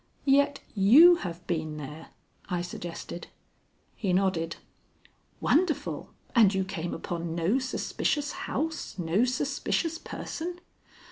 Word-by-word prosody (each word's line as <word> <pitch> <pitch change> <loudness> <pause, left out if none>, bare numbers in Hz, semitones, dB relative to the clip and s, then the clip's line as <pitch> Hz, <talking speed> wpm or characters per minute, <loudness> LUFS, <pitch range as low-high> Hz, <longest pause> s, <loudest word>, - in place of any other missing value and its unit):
"Yet 280 +1 +3
you 275 - +8
have 175 - -6
been 155 -3 -2
there?" 150 +2 -8 0.4
I 175 -2 -1
suggested. 175 0 -7 0.7
He 195 -5 -1
nodded. 180 -3 +1 0.8
"Wonderful! 320 -1 +1 0.2
And 210 -5 +5
you 190 - +2
came 175 -3 -4
upon 170 -1 -4
no 175 +10 +2
suspicious 290 +3 -1 0.2
house, 315 -3 -3
no 180 +6 +2
suspicious 290 +5 -1
person?" 350 +1 -5
195 Hz, 110 wpm, -28 LUFS, 170-285 Hz, 0.8 s, you